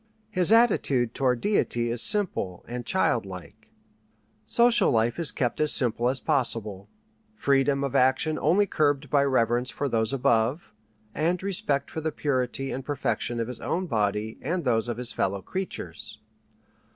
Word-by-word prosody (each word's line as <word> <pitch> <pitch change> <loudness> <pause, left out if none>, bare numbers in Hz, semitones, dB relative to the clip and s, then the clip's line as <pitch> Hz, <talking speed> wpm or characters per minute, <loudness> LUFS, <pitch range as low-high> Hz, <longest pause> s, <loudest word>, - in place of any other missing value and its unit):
His 185 -2 +2
attitude 140 - +3
toward 125 -3 0
Deity 120 - 0
is 120 0 +4
simple 180 - +1
and 120 0 -6
childlike. 100 - -2 0.8
Social 235 - +4
life 115 +5 +1
is 165 - +1
kept 120 +3 -2
as 150 - +4
simple 120 -1 +2
as 130 0 +1
possible, 110 -8 -1 0.5
freedom 140 -5 +1
of 140 - -3
action 130 +5 +2
only 185 +7 +3
curbed 145 -6 0
by 140 -1 +4
reverence 125 -2 +1
for 145 - -3
Those 110 -3 0
Above, 130 +2 0 0.4
and 175 +4 -1
respect 145 -8 -1
for 160 - -5
the 160 0 -2
purity 135 -2 -2
and 130 - -5
perfection 125 -4 -2
of 115 - -2
his 125 -1 -7
own 185 +2 -2
body 105 - -2
and 170 +5 -2
those 115 -2 +1
of 120 - -3
his 125 -1 -3
fellow 95 0 -2
creatures. 110 - -6
130 Hz, 150 wpm, -26 LUFS, 115-155 Hz, 0.8 s, is